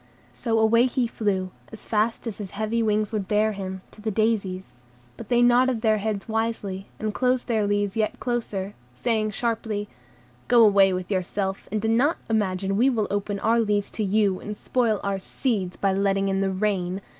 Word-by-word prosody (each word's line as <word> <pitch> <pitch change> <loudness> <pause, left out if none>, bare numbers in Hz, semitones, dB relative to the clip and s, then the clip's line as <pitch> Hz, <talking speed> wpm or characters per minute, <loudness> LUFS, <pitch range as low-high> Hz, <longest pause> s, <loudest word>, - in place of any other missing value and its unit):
So 225 - -1
away 230 +3 +4
he 250 0 0
flew, 195 -5 -1 0.2
as 220 - -11
fast 220 +3 0
as 220 -3 -5
his 200 -2 -5
heavy 220 +2 0
wings 215 -1 +1
would 205 -3 -2
bear 215 +1 +2
him, 190 -2 -5
to 215 - -15
the 220 - -2
daisies; 200 -3 -1 0.4
but - - -10
they 240 -1 +4
nodded 245 -1 +4
their 215 -1 +3
heads 205 -1 -3
wisely, 220 -4 -2
and 215 -1 -3
closed 255 +1 +1
their 220 -4 +1
leaves 205 -1 0
yet 215 -1 -1
closer, 210 -5 -3 0.2
saying 215 - 0
sharply,— 215 -1 -2 0.6
"Go 235 -2 +6
away 195 -2 +5
with 185 +1 -4
yourself, 190 +1 -2
and 215 - 0
do - - +1
not 250 +9 +3
imagine 195 -2 0
we 250 +5 +4
will 225 -5 0
open 205 0 -1
our 230 +2 +3
leaves 205 -2 0
to 220 - -2
you, 200 -1 +2
and 210 0 -6
spoil 230 -4 0
our 200 -1 -1
seeds 195 -3 -2
by 195 -1 +1
letting 195 0 +1
in 195 0 0
the 195 - +1
rain. 190 -1 -1
210 Hz, 190 wpm, -25 LUFS, 195-225 Hz, 0.6 s, Go